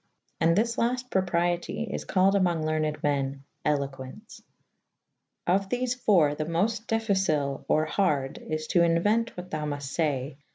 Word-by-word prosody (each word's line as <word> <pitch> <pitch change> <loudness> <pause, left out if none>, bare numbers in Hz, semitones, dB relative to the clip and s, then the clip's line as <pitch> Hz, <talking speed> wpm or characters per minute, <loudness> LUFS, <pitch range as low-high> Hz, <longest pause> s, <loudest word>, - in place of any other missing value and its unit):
And 165 0 +3
this 230 +3 +1
lafte 250 +2 -1
propriete 175 +3 0
is - - -4
callyd 190 +1 +3
amonge 175 -5 +1
lernyd 155 -1 -1
men 140 -1 -1 0.2
eloquence. 140 - -3 1.0
Of 190 +2 +1
thefe 250 +1 -2
.iiii.' 155 -8 +4
the 155 - -2
moft 210 +8 -1
difficile 190 -11 0
or 155 0 +2
harde 150 -6 0
is 155 0 -4
to 175 - +3
inuente 205 +8 +3
what 180 +1 -8
thou 155 -1 -2
mufte 145 -2 -4
faye, 140 -5 0
wher - - -18
' - - -29
B. 145 - -36
170 Hz, 160 wpm, -27 LUFS, 150-200 Hz, 1.0 s, iiii